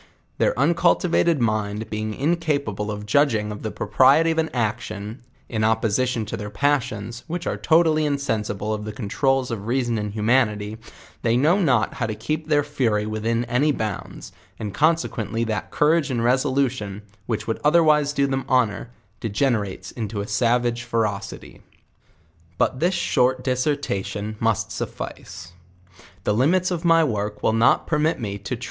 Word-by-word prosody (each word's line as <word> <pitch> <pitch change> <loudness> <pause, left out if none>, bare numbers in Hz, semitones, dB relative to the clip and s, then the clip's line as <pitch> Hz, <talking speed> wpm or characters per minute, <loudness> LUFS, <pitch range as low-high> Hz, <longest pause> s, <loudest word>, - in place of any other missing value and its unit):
Their - - +2
uncultivated 170 +2 +2
mind 110 -1 -1
be 105 - -2
ing 110 0 -2
1 - - -11
incapable 140 - 0
of 105 0 -5
judging 110 -3 +2
of 105 - -7
the 110 - -3
propriety 135 +12 +3
of 160 - 0
an 160 0 0
action, 110 -1 -3 0.3
in 110 -2 -2
op 110 +1 +3
position 115 +1 0
to 105 - -5
their 105 0 -6
passions, 120 -2 -1
whicti 175 +1 -4
are - - -1
totally 160 -1 +3
insensible 110 -7 -2
of 105 0 -4
the 110 - -5
controuls 130 +4 0
of 105 -2 -5
reason 120 -2 0
and 105 0 -3
humanity, 105 -1 +1 0.4
they 115 0 +2
know 165 +10 +3
not 125 - +2
how 120 - -2
to 110 - -3
keep 150 +8 -3
their 145 -2 +3
fury 120 -8 0
within 115 +2 -1
any 125 +6 +2
bounds, 110 -8 -5 0.3
and 105 -3 -5
consequently 140 -6 0
that 110 -4 -3
courage 155 0 +2
and 120 -3 -1
resolution, 130 -5 0 0.2
which 110 -3 -2
would 115 - -2
otherwise 150 -2 +4
do 140 -1 +1
them 135 -1 -1
hon 125 -4 +3
or, 110 - -8 0.3
degenerates 105 -5 -1
into 110 -2 -4
a - - -4
savage 120 0 +1
ferocity. 110 -4 -3 1.0
But 130 - +1
this 175 +4 +2
short 125 +1 +1
discretion 125 -6 -2
must 115 -3 0
suffice; 90 0 -7 0.7
the 105 - +1
limits 170 - +2
of 170 -2 -2
my 165 -1 +5
work 105 -6 -2
will 110 - +3
not 115 +1 +3
permit 155 0 +1
me 100 -4 -4
to - - -4
tre^. - - -18
120 Hz, 165 wpm, -23 LUFS, 105-145 Hz, 1.0 s, my